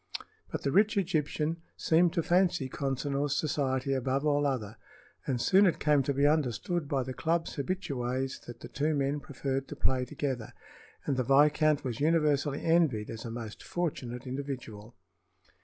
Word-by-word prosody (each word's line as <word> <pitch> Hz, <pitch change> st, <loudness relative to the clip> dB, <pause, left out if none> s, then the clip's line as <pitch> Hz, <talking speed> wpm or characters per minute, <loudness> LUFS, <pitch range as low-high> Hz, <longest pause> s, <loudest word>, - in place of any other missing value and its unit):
But -, -, -4 dB
the 140 Hz, -, 0 dB
rich 205 Hz, +5 st, +3 dB
Egyptian 160 Hz, -3 st, 0 dB, 0.2 s
seemed 165 Hz, +1 st, +3 dB
to 170 Hz, -, 0 dB
fancy 175 Hz, -5 st, +2 dB
Consinor's 140 Hz, +1 st, -1 dB
society 135 Hz, -3 st, 0 dB
above 135 Hz, +2 st, 0 dB
all 145 Hz, -1 st, +2 dB
other, 115 Hz, -5 st, -3 dB, 0.5 s
and 130 Hz, -3 st, 0 dB
soon 195 Hz, +10 st, +5 dB
it 170 Hz, -, +1 dB
came 150 Hz, -2 st, +3 dB
to 135 Hz, -, -1 dB
be 140 Hz, +1 st, +3 dB
understood 150 Hz, +2 st, +1 dB
by 135 Hz, -2 st, 0 dB
the 130 Hz, +1 st, -5 dB
club's 165 Hz, +5 st, -1 dB
habitués 135 Hz, -5 st, -2 dB
that 120 Hz, -, -9 dB
the -, -, -7 dB
two 145 Hz, +6 st, 0 dB
men 140 Hz, +1 st, 0 dB
preferred 135 Hz, -1 st, -3 dB
to -, -, -7 dB
play 130 Hz, -1 st, +1 dB
together, 125 Hz, -3 st, -4 dB, 0.5 s
and 135 Hz, -, 0 dB
the 130 Hz, -, +1 dB
viscount 150 Hz, +3 st, +4 dB
was 120 Hz, -4 st, -3 dB
universally 150 Hz, -2 st, +2 dB
envied 160 Hz, -11 st, +2 dB
as 115 Hz, 0 st, -7 dB
a -, -, -4 dB
most 115 Hz, -1 st, -7 dB
fortunate 130 Hz, -8 st, -4 dB
individual. 125 Hz, -5 st, -6 dB
140 Hz, 160 wpm, -30 LUFS, 130-155 Hz, 0.5 s, soon